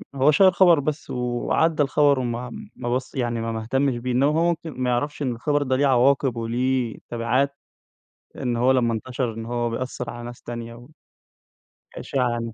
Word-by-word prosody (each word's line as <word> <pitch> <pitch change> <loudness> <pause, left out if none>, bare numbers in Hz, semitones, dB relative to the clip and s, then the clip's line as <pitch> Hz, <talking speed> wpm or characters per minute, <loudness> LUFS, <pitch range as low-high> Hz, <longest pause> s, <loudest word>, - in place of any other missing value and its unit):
هو 135 +3 +4
شيّر 190 +5 +6
خبر 175 -4 +5
بس 150 +1 -3
وعدى 125 +6 +1
الخبر، 145 -1 +3
وما 120 0 -3 0.2
ما 120 - -4
بص 130 +3 -4
يعني 120 -3 -1
ما 115 0 -2
ما 110 0 -3
اهتمش 135 +2 0
بيه، 125 +1 -3
إنما 135 +4 +3
هو 165 - +3
ممكن 165 -1 -3
ما 125 - +1
يعرفش 145 +5 -1
إن 130 -3 0
الخبر 145 +5 0
ده 130 -1 0
ليه 140 +2 +2
عواقب 135 0 +3
وليه 120 +1 -1
تبعات، 125 +4 0 0.8
إن 120 -2 -2
هو 125 +2 +3
لما 120 -3 +2
انتشر 120 0 -3
إن 115 0 -6
هو 120 0 -1
بيأثر 125 0 -4
على 120 0 -8
ناس 120 0 -9
تانية 120 0 -8 1.1
وإشاعة 125 -3 -1
يعني 115 -1 -3
125 Hz, 180 wpm, -23 LUFS, 120-140 Hz, 1.1 s, شيّر